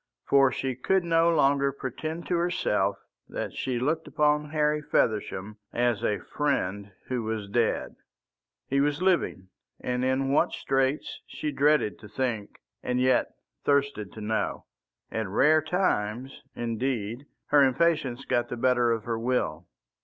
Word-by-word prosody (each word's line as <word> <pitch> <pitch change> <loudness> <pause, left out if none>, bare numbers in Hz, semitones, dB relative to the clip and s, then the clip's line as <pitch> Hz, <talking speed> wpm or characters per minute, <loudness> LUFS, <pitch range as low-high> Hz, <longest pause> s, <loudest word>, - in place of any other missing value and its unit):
For 135 -1 +5
she 130 +1 -2
could 190 +9 +1
no 165 0 +3
longer 140 -3 +3
pretend 155 +5 -5
to 175 - 0
herself 105 - +1 0.3
that - - -4
she 130 -2 -2
looked 155 +6 -1
upon 150 0 +1
Harry 150 0 +1
Feversham 105 -5 -1
as 120 -3 0
a 105 - +1 0.2
friend 100 -9 -1
who 125 -2 -2
was 110 -2 -3
dead. 115 +3 0 0.7
He 140 +1 +2
was 145 +1 +1
living, 175 - +1 0.3
and 125 0 -2
in 130 +1 +1
what 140 - +3
straits 135 +2 -1
she 150 - -4
dreaded 145 -5 +2
to 105 - -11
think, 110 -2 -3 0.2
and 125 0 -1
yet 130 0 +2 0.3
thirsted 140 -8 +1
to 110 - -9
know. 110 +1 -2 0.5
At 110 -2 -2
rare 150 +11 +4
times, 135 - -1
indeed, 120 +1 -2 0.2
her 145 -1 +6
impatience 135 -2 +2
got 120 0 0
the 120 - -4
better 125 -1 +3
of 115 -2 -1
her 115 -1 -2
will. 115 -9 -1
130 Hz, 145 wpm, -27 LUFS, 115-150 Hz, 0.7 s, her